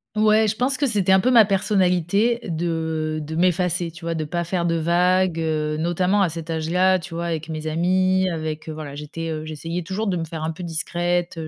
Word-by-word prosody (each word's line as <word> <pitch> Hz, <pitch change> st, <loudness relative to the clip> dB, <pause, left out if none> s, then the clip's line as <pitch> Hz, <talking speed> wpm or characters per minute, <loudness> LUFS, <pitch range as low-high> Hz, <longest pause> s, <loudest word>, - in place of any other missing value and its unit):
Ouais, 215 Hz, +1 st, +4 dB
je 210 Hz, -, 0 dB
pense 255 Hz, +3 st, 0 dB
que 285 Hz, -, +1 dB
c'était 205 Hz, -7 st, +1 dB
un 190 Hz, -, +6 dB
peu 250 Hz, +6 st, +2 dB
ma 235 Hz, -3 st, +8 dB
personnalité 195 Hz, +2 st, +1 dB
de, 160 Hz, -2 st, -2 dB
heu, -, -, -4 dB
de 150 Hz, +1 st, -6 dB
m'effacer, 180 Hz, 0 st, +1 dB
tu 165 Hz, +1 st, -12 dB
vois, 170 Hz, -, -1 dB
de 160 Hz, -1 st, -3 dB
pas 170 Hz, +3 st, -2 dB
faire 175 Hz, 0 st, -1 dB
de 165 Hz, -, +1 dB
vagues, 175 Hz, +1 st, +2 dB
heu, 155 Hz, -1 st, -1 dB
notamment 180 Hz, +5 st, +1 dB
à 190 Hz, -, +3 dB
cet 165 Hz, 0 st, -6 dB
âge-là. 180 Hz, +4 st, +2 dB
Tu 170 Hz, -1 st, -9 dB
vois, 170 Hz, +1 st, -3 dB
avec 160 Hz, -2 st, -3 dB
mes 155 Hz, -1 st, -5 dB
amis, 185 Hz, +3 st, +2 dB
avec, 155 Hz, -2 st, -4 dB
heu, -, -, -4 dB
voilà, 155 Hz, -2 st, -7 dB
j'étais, 150 Hz, +3 st, -6 dB
heu, 155 Hz, -1 st, -4 dB
j'essayais 165 Hz, +3 st, -5 dB
toujours 190 Hz, +5 st, -3 dB
de 195 Hz, -4 st, 0 dB
me 170 Hz, -, -2 dB
faire 160 Hz, -1 st, -6 dB
un 160 Hz, -, -1 dB
peu 160 Hz, -, -9 dB
discrète. 175 Hz, +1 st, -2 dB
170 Hz, 225 wpm, -22 LUFS, 160-185 Hz, -, ma